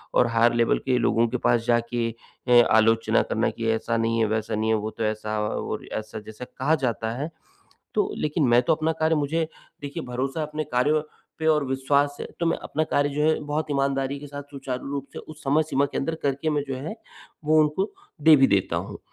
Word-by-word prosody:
और 125 - +5
higher 115 +1 +3
level 115 -1 +2
के 130 -1 +2
लोगों 115 0 +2
के 125 - -2
पास 115 -1 +1
जाके 120 0 +1 0.4
अ, - - 0 0.2
आलोचना 115 +1 +4
करना - - 0
कि 115 -1 -4
ऐसा 115 +1 -1
नहीं 115 0 +1
है, 110 - +3
वैसा 110 0 -1
नहीं 110 +1 0
है, 110 - +4
वो 110 0 -2
तो 115 - -5
ऐसा 110 0 -2
और - - -4
ऐसा, 110 0 -5
जैसे 110 +4 -9
कहा 145 +6 0
जाता 115 -1 -1
है। 150 +4 -3 0.6
तो 410 0 +1
लेकिन 150 +1 0
मैं 120 +1 +6
तो - - +3
अपना 160 +1 0
कार्य 160 0 +3
मुझे, 155 +2 0 0.3
देखिए, 145 0 -5
भरोसा 135 +5 -3
अपने 150 +1 -3
कार्यों 145 +4 +1 0.4
पे 160 - -3
और 150 -2 +4
विश्वास 140 +2 +1
है, - - -5
तो 170 - 0
मैं 165 - +1
अपना 155 +2 -1
कार्य 145 0 +2
जो 145 +1 -2
है, 155 0 +3
बहुत 150 +1 -2
ईमानदारी 140 0 0
के 145 - -9
साथ, 145 0 -7
सुचारू 135 -2 -5
रूप 140 -1 -4
से - - -6
उस 155 0 -12
समय 145 +3 +3
सीमा 140 -2 +1
के 140 - -5
अंदर 160 +4 -1
करके, 140 +3 0
मैं 145 -2 0
जो 135 - -3
है, 155 - -5 0.5
वो 155 +1 +5
उनको 155 +7 0 0.3
दे 160 0 +8
भी 135 -1 +5
देता 100 -2 +1
हूँ। - - -6
135 Hz, 220 wpm, -25 LUFS, 115-150 Hz, 0.6 s, दे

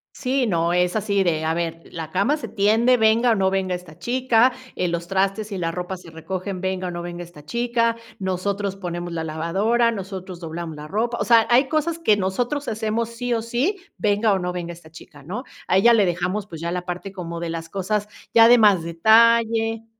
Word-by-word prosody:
Sí, 260 -2 0
no. 170 -2 +1
Es 180 +2 +1
así 200 -2 +1
de: 160 -3 0
"A 160 - +1
ver, 165 0 -3
la 160 -2 -6
cama 200 +11 +2
se - - -6
tiende 225 +5 +3
venga, 225 +2 +4
o - - +3
no 190 -1 +2
venga 190 -1 0
esta 175 -3 -11
chica". 250 +2 +3 0.2
Eh, 180 - 0
los 170 0 -3
trastes 195 +3 -1
y 195 - -3
la 165 -2 -1
ropa 180 +2 -5
se 170 - -14
recogen 185 +3 -5
venga, 190 -1 -2
o - - -4
no 175 0 -5
venga 175 0 -6
esta 150 -4 -14
chica. 235 +3 0 0.2
Nosotros 195 +1 -2
ponemos 175 -2 -5
la 165 -1 -3
lavadora, 195 +10 +1
nosotros 190 -3 -7
doblamos 165 -1 -6
la 150 0 -9
ropa. 230 +7 -1
O - - +1
sea, 230 -2 +5
hay 260 +3 +4
cosas 320 +2 0
que 215 -11 +3
nosotros 245 +9 -2
hacemos 220 +1 -1
sí 240 +1 -3
o 230 - 0
sí, 250 - -1 0.2
venga 205 0 +2
o 190 - 0
no 180 0 -2
venga 175 -1 -5
esta 165 -1 -15
chica, 150 -3 -14
¿no? 210 - -5 0.2
A 185 - +3
ella 235 +5 +6
le 210 -4 +4
dejamos, 180 +4 -2
pues, 165 -4 -9
ya 170 0 -2
la 180 0 -3
parte 180 +2 -5
como 170 -3 -6
de 170 -1 -4
las 165 0 -5
cosas, 205 +2 -2 0.3
ya 230 0 +8
de 245 +1 +7
más 205 -6 +5
detalle. 225 +5 +3
195 Hz, 215 wpm, -22 LUFS, 175-230 Hz, 0.3 s, ya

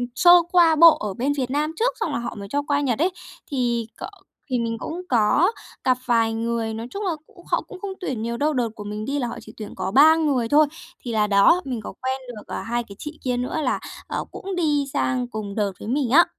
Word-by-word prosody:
sơ 350 - +7 0.2
qua 340 -3 +6
bộ 330 +1 +8
ở 210 -2 -4
bên 265 +8 0
Việt 255 -1 -2
Nam 300 +2 0
trước, 475 +8 +1
xong 320 - -1
là - - -1
họ 235 - -5
mới 200 -1 -7
cho 285 - +1
qua 285 0 +2
Nhật 245 -5 0
ấy, 350 +5 +2 0.4
thì 240 -4 0
c - - -7 0.5
thì 250 -2 0
mình 230 -1 -2
cũng 345 +3 -5
có 250 - +3 0.3
gặp 255 -1 +3
vài 230 -2 +2
người. 225 0 -2
Nói 225 +2 -5
chung 410 +7 -4
là 370 - +1 0.2
cũng 350 - -18
họ - - +3
cũng 390 -6 -12
không 395 -1 -4
tuyển 265 - -3
nhiều 235 +1 -3
đâu, 300 +3 +1
đợt 245 -3 0
của 210 - -8
mình 210 +1 -5
đi 280 +3 -1
là 245 - -1
họ 235 - -6
chỉ 220 - -13
tuyển 215 - -8
có 190 0 -3
3 305 +7 +7
người 280 -7 +1
thôi. 300 0 +5 0.3
Thì 240 - -6
là 215 -2 +2
đó, 205 - +5
mình 245 -5 -3
có - - -7
quen 260 +1 -2
được 220 -4 -9
2 240 +1 -1
cái 200 -3 -12
chị 300 +1 -8
kia 250 -1 0
nữa 250 +5 -2
là, 255 -4 0 0.3
ờ, - - -3
cũng 390 -1 -6
đi 295 -5 +1
sang 250 -1 0
cùng 215 -4 -6
đợt 205 -2 0
với - - -8
mình 260 0 0
á. 330 +7 +7
250 Hz, 255 wpm, -23 LUFS, 225-305 Hz, 0.5 s, bộ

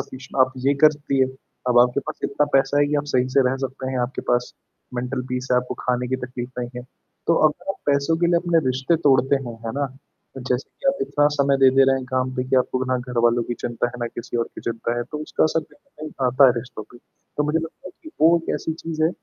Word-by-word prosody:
Sufficient 130 +1 -5
आप 130 - -13
ये 140 - +4
करती 145 -3 +3
हैं, 130 - +3 0.4
अब 120 -1 +4
आपके 125 +2 +3
पास 155 +1 -7
इतना 145 +1 +1
पैसा 135 +1 +3
है 145 - +4
कि 150 - -1
आप - - -12
सही 125 0 +3
से 135 - +7
रह 135 - -1
सकते 130 0 -5
हैं, 130 - -2
आपके 125 +2 -3
पास 125 0 +1 0.4
मेंटल 125 +2 -2
पीस 125 0 -3
है, - - +5
आपको 125 0 -1
खाने 125 0 -1
की 130 - 0
तकलीफ 125 0 -6
नहीं 120 0 -3
है। 125 - -5 0.4
तो 170 - +4
अगर 180 +5 -6
आप - - -4
पैसों 140 +3 +2
के 170 - +2
लिए 170 - +3
अपने 170 -1 +3
रिश्ते 135 +6 +1
तोड़ते 135 +1 +4
हैं। 120 -1 -7
है 115 - -3
ना? 140 +1 -1 0.5
जैसे 125 +1 -2
कि 275 - -4
आप 275 - +1
इतना 145 0 +2
समय 140 -1 +3
दे 135 -1 +7
दे 135 - +7
रहे 135 0 +3
हैं 130 - -4
काम 130 0 0
पे 125 - -1
कि 130 - +3
आपको 130 0 +1
ना - - +2 0.2
घरवालों 120 0 +3
की 120 - -1
चिंता 120 0 -1
है, 120 - -7
ना 120 - -1
किसी 120 +1 -6
और 115 - +1
की - - -8
चिंता 115 +1 -3
है, - - -1
तो 150 +5 -7
उसका - - 0
असर 160 +1 +1
कहीं 280 - -13
न - - -5
कहीं 130 - -2
आता 130 +2 +6
है 125 - +5
रिश्तों 115 -2 -8
पे। 120 - -13 0.4
तो 150 - +2
मुझे 155 +2 +1
लगता 165 +3 -7
है - - -14
कि 315 - -11
वो 165 +2 +6
एक - - -1
ऐसी 160 - -3
चीज़ 160 -1 -3
है - - +4
130 Hz, 265 wpm, -22 LUFS, 125-150 Hz, 0.5 s, से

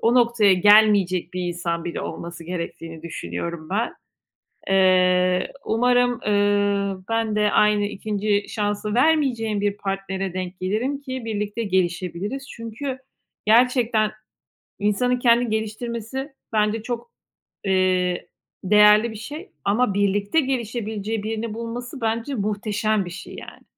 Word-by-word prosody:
o 230 +2 +3
noktaya 235 -5 +4
gelmeyecek 195 -2 +4
bir 185 - -2
insan 170 -1 -3
bile 175 - -4
olması 170 0 -7
gerektiğini 165 -2 -6
düşünüyorum 155 - -5
ben. 220 +5 -1 0.8
Eee, 185 -1 +3
umarım, 245 +1 +2
eee, 205 -1 +2
ben 225 -1 0
de 210 0 +2
aynı 210 -1 +4
2'nci 205 0 -1
şansı 205 0 -2
vermeyeceğim 245 -7 +2
bir 205 0 0
partnere 195 -1 -3
denk 185 0 -5
gelirim 230 +10 -1
ki 260 -3 -6
birlikte 210 0 -3
gelişebiliriz. 190 +6 -2
Çünkü 245 +4 -6 0.5
gerçekten 230 -1 +3 0.7
insanın 245 +5 +1
kendini 240 -1 +4
geliştirmesi 235 +5 -4 0.2
bence 215 +1 +1
çok, 235 0 -5 0.5
eee, 185 -2 +1 0.4
değerli 210 +3 +6
bir - - -9
şey 300 - -8 0.2
ama 210 +2 +2
birlikte 205 +7 +1
gelişebileceği 225 -5 -2
birini 220 0 -3
bulması 240 +3 -6
bence 230 +5 -1
muhteşem 210 -1 -1
bir - - -6
şey, 180 +3 -9
yani. - - -11
210 Hz, 120 wpm, -23 LUFS, 195-235 Hz, 0.8 s, değerli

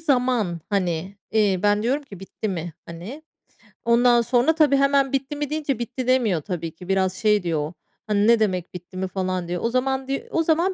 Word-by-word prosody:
zaman, 250 - +1
hani, 185 0 -1 0.2
iii, 205 -4 +2
ben 205 +1 +3
diyorum 270 +5 0
ki 195 -9 -12
"Bitti 210 +2 -5
mi?" 175 -3 -4
hani. 185 - -8 0.6
Ondan 240 0 +5
sonra 245 +6 +2
tabii, 300 -4 +4
hemen 275 -1 +3
bitti 270 +2 -1
mi 290 -1 -3
deyince 295 -5 -2
bitti 250 +2 -4
demiyor 225 - +2
tabii 165 -1 -4
ki. 180 +2 -12
Biraz 190 -1 +2
şey 210 -1 +2
diyor 165 -3 0
o, 150 +4 -4 0.3
hani, 210 0 +2
"Ne 235 -1 +6
demek 185 -5 -1
bitti 180 +1 -9
mi?" 190 0 -1
falan 185 -1 -2
diyor. 175 0 -3
O 230 - +2
zaman 265 +1 0
diy 275 0 -2
o 330 - +1
zaman 340 +4 +2
220 Hz, 200 wpm, -23 LUFS, 185-265 Hz, 0.6 s, Ne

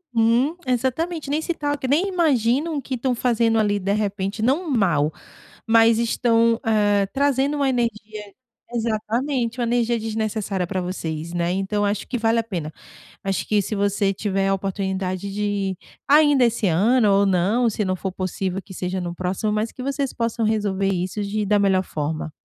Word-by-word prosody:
Uhum, 235 +8 +3
exatamente, 275 +7 -1
nem 305 +2 0
se 345 0 -2
toquem, 290 -3 -2
nem 330 +8 +3
imaginam 295 - +1
que 260 0 -6
estão 250 +1 -1
fazendo 230 -2 +2
ali, 205 -1 +2
de 195 +2 -1
repente, 205 0 -2
não 300 +7 +1
mal, 170 - +2 0.6
mas 225 0 +5
estão, 230 0 +2
eh, 205 -2 +3
trazendo 280 +1 +1
uma 275 -1 +2
energia 215 -4 -3 0.4
exatamente, 235 +2 -1
uma 240 - +1
energia 235 -1 +1
desnecessária 215 -3 -2
para 185 +1 -3
vocês, 165 -2 -4
né. 175 0 -1
Então, 195 +2 -1
acho 205 0 -2
que 250 - -2
vale 225 +1 +2
a 230 - 0
pena, 170 -8 -5 0.5
acho 195 -1 -2
que 210 -1 +2
se 210 - -4
você 200 0 +1
tiver 195 -1 -1
a 195 - +2
oportunidade 190 0 -3
de, 200 -2 -2 0.3
ainda 290 -3 +5
esse 235 -2 0
ano 215 +7 +3
ou 200 +1 +4
não, 200 +6 +2
se 210 -1 -2
não 185 0 0
for 190 +1 -4
possível, 185 0 -3
que 190 - -12
seja 185 +1 -3
no 175 -1 -4
próximo, 185 +4 -2
mas 215 +2 -1
que 255 - -8
vocês 275 -1 -2
possam 230 -1 -2
resolver 205 -3 0
isso 185 +2 -2
de 210 +1 -2
da 205 +1 +3
melhor 190 -2 +3
forma. 155 0 -4
215 Hz, 175 wpm, -22 LUFS, 195-245 Hz, 0.6 s, mas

